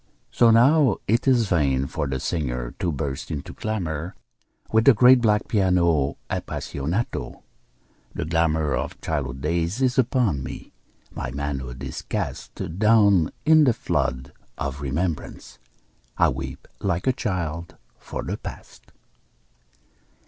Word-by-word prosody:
So 120 - +5
now 125 +1 +5
it 115 +5 +1
is 120 -5 +4
vain 70 -7 +1
for 70 - -3
the 65 -1 -2
singer 60 -7 -3
to 90 - 0
burst 70 -2 -4
into 75 -3 -5
clamor 90 -5 -3 0.6
With 110 0 +3
the 135 - +7
great 125 +3 +7
black 105 -2 +2
piano 85 -8 +2
apassionato. 85 - -3 0.7
The - - -2
glamor 80 -2 +1
Of - - -3
childhood 65 -5 -3
days 85 - -1
is 130 0 +2
upon 120 - +1
me, 65 - -8 0.4
my - - -5
manhood 65 -1 -4
is 65 - -5
cast 85 +4 -5
Down 105 -6 +5 0.2
in 155 -1 +6
the 125 - +4
flood 70 - -2 0.2
of 70 0 -4
remembrance, 75 +3 -4 0.6
I - - +4
weep 65 0 -6
like 90 -3 -1
a 130 - +3
child 85 - -3 0.2
for - - -6
the - - -3
past. - - -11
85 Hz, 130 wpm, -24 LUFS, 70-110 Hz, 0.7 s, the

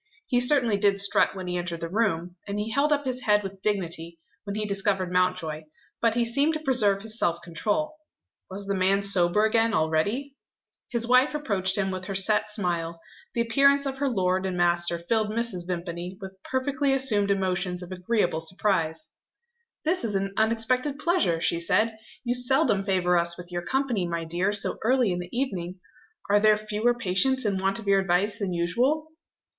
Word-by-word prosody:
He 245 - +1
certainly 245 -4 +4
did 200 -1 +2
strut 200 0 +3
when 190 -1 -6
he 180 0 -2
entered 170 -2 -5
the 165 - -3
room; 180 -3 -1
and 200 0 -3
he 210 +2 -3
held 280 +5 +2
up 290 -1 +1
his 255 -1 -3
head 210 -2 +2
with 195 0 -8
dignity, 170 -5 -2 0.3
when 200 0 -4
he 215 0 -2
discovered 195 -2 -1
Mountjoy. 180 -4 0 0.4
But 230 -1 +2
he 240 -1 +2
seemed 280 +7 +1
to - - -2
preserve 220 -9 +1
his 220 +1 -6
self 170 0 0
control. 210 - -2 0.5
Was 195 +1 -7
the 200 - -1
man 195 +1 +2
sober 200 +1 +3
again 225 0 +2
already? 205 - 0 0.5
His 235 -1 -1
wife 255 +4 +4
approached 195 -10 -1
him 195 -1 0
with 185 0 -5
her 195 - -4
set 210 +3 +2
smile; 170 -5 -2 0.4
the 235 - +2
appearance 280 +4 +3
of 270 -1 -4
her 280 -1 +1
lord 185 -4 0
and 180 -1 -3
master 175 0 +2
filled 215 +5 0
Mrs. 215 -6 -3
Vimpany 175 +1 -5
with 190 -2 -7
perfectly 270 +2 0
assumed 220 -7 +2
emotions 185 -2 -1
of 180 - -11
agreeable 185 -2 0
surprise. 165 -3 -1 0.7
"This 340 0 0
is 215 -3 -2
an 195 0 -1
unexpected 230 +6 0
pleasure," 300 - +1
she 170 0 0
said. 220 +6 +1 0.3
"You 245 -1 0
seldom 250 -4 +2
favour 180 -2 +2
us 170 0 -1
with 180 0 -10
your 175 0 -2
company, 255 -9 0
my 170 -1 -3
dear, 175 +5 0
so 205 -1 -2
early 245 -2 +3
in 180 - -2
the 175 0 -7
evening! 190 -8 -3 0.5
Are 205 +1 +4
there 215 0 +5
fewer 215 +3 0
patients 240 +4 +1
in 195 -2 0
want 195 +1 0
of 225 - -9
your 200 -1 +4
advice 195 +3 +1
than 200 -3 -2
usual?" 250 - 0
200 Hz, 185 wpm, -26 LUFS, 180-235 Hz, 0.7 s, there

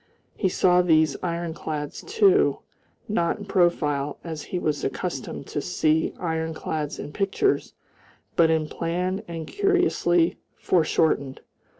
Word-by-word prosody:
He 190 - +1
saw 180 0 +4
these 160 -4 +3
ironclads, 165 -4 -4
too, 410 -2 +3 0.5
not 170 -4 0
in 205 - -8
profile, 150 -7 +1
as 160 -3 -5
he 180 - -4
was 150 -4 -1
accustomed 135 -2 -4
to 145 - -2
see 160 -1 +1
ironclads 160 -2 -3
in 145 - -7
pictures, 205 - 0 0.6
but 165 -1 +5
in 160 -1 +1
plan 180 +5 -2
and 165 -2 -5
curiously 360 - +2 0.2
foreshortened. 155 -5 +1
170 Hz, 115 wpm, -25 LUFS, 155-185 Hz, 0.6 s, but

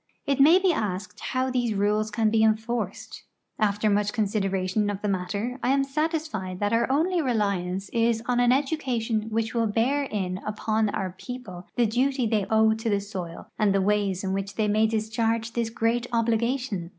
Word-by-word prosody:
It 280 -1 0
may 310 +6 +7
be 375 -2 +3
asked 185 - -3
how 260 0 -1
these 240 -4 0
rules 210 +2 +1
can 220 0 +1
be 220 0 +3
enforced. 220 -2 -1 0.4
After 210 0 +1
much 205 0 +1
consideration 200 -1 0
of 205 0 -4
the - - 0
matter, 205 +6 -2
I - - 0
am 275 +1 +3
satisfied 285 - -2
that 205 +1 0
our 235 +2 +2
only 340 +5 +2
reliance 200 - -1
is 230 -1 +1
on 245 -1 +1
an 245 0 +4
education 250 -6 0
which 225 0 -1
will 230 -2 +1
bear 235 +7 +1
in 185 -6 -3
upon 215 +1 0
our 190 -2 -3
people 220 -8 -8
the 240 - +3
duty 255 +3 +1
the}" 215 -3 0
owe 220 0 +5
to 225 +1 -3
the 205 -1 +2
soil 185 -4 -7
and 205 -2 +3
the - - +3
ways 200 -1 0
in 190 0 -1
which 195 0 -3
they 215 -1 +1
may 215 +1 +3
discharge 225 +1 -1
this 235 -1 -1
great 230 +1 0
obligation. 230 -4 0
220 Hz, 185 wpm, -26 LUFS, 205-245 Hz, 0.4 s, may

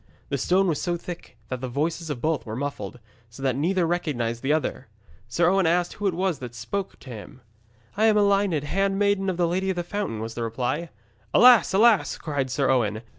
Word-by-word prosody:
The 140 - -1
stone 185 +8 +2
was 160 -4 0
so 175 -1 -1
thick 170 -7 -9
that 130 -1 -4
the 130 - -3
voices 160 +6 -2
of 135 -5 -4
both 160 -2 0
were 110 -1 -6
muffled, 125 -4 -5 0.3
so 115 +4 -11
that 130 -2 +1
neither 175 +5 +1
recognised 125 -9 -2
the 135 - 0
other. 150 -4 -1 0.4
Sir 170 +9 +2
Owen 190 -1 +3
asked 175 +1 +1
who 205 - -2
it 185 - 0
was 185 -4 -1
who 125 - -6
spoke 185 +12 -4
to 130 - -12
him. 115 +3 -10 0.6
'I 215 - +3
am 220 -1 +5
Elined, 200 -6 +2
handmaiden 195 +3 +1
to 190 - +1
the 175 -1 +1
Lady 190 +3 -1
of 190 - 0
the 175 - -2
Fountain,' 185 - -3
was 115 +1 -5
the 120 - -5
reply. 125 +8 -2 0.5
'Alas! 245 -2 +7
alas!' 215 +2 +4
cried 140 -4 -2
Sir 135 +2 0
Owen. 110 -4 0
165 Hz, 210 wpm, -25 LUFS, 130-190 Hz, 0.6 s, Alas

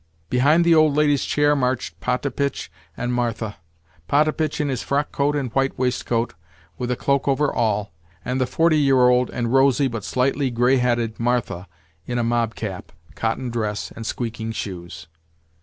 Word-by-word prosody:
Behind 150 +7 +4
the 170 - +5
old 155 -2 +4
lady's 145 -2 +2
chair 145 0 +2
marched 130 -2 -1
Potapitch 140 +2 -2 0.3
and 125 +1 -2
Martha—Potapitch 110 - -2
in 150 - 0
his 130 -4 -2
frockcoat 145 +1 0
and 135 -5 -3
white 135 0 0
waistcoat, 125 -2 -1 0.5
with 125 - -2
a 125 - +1
cloak 140 +2 0
over 140 +1 +1
all, 105 -4 0 0.3
and 130 +1 -1
the 130 - +1
forty 165 +2 +3
year 135 -3 +5
old 125 0 +3
and 120 0 -2
rosy, 135 +1 +4
but 115 -5 -5
slightly 130 +4 0
grey 125 +2 +3
headed, 120 -3 0
Martha 115 -6 -1 0.4
in 120 - -2
a 120 - +1
mobcap, 115 -4 -2 0.2
cotton 115 +6 -2
dress, 105 -3 -3
and 115 -1 -7
squeaking 115 -2 -4
shoes. 85 -6 -6
125 Hz, 155 wpm, -22 LUFS, 115-140 Hz, 0.5 s, the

